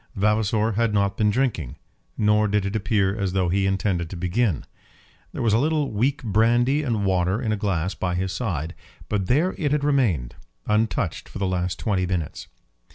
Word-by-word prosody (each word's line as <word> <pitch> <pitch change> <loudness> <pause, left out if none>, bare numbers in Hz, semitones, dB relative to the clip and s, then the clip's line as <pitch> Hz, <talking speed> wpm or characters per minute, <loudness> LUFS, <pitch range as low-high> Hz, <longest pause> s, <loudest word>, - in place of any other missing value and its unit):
Vavasor 105 +1 +1
had 110 0 0
not 100 -1 +1
been 105 -1 +2
drinking, 100 - -1 0.4
nor 105 0 +3
did 105 -1 0
it 100 +2 -3
appear 100 -2 +1
as 100 -4 -2
though 95 -2 +1
he 95 +2 +1
intended 95 -3 0
to 95 - -7
begin. 90 - 0 0.7
There - - -4
was 110 -3 +3
a 110 - +4
little 150 0 +1
weak 125 +7 0
brandy 120 +6 +3
and 115 -8 -1
water 95 +2 +1
in 115 -4 -1
a - - +2
glass 95 -3 -1
by 90 -1 -2
his 95 +1 -2
side, 85 - -3 0.4
but 100 -3 -1
there 160 - +2
it 145 -4 0
had 150 -1 +1
remained 115 - +1 0.3
untouched 110 - 0
for - - -8
the 100 - -1
last 90 -1 -1
twenty 95 -4 0
minutes. 90 -5 -3
105 Hz, 185 wpm, -24 LUFS, 95-115 Hz, 0.7 s, a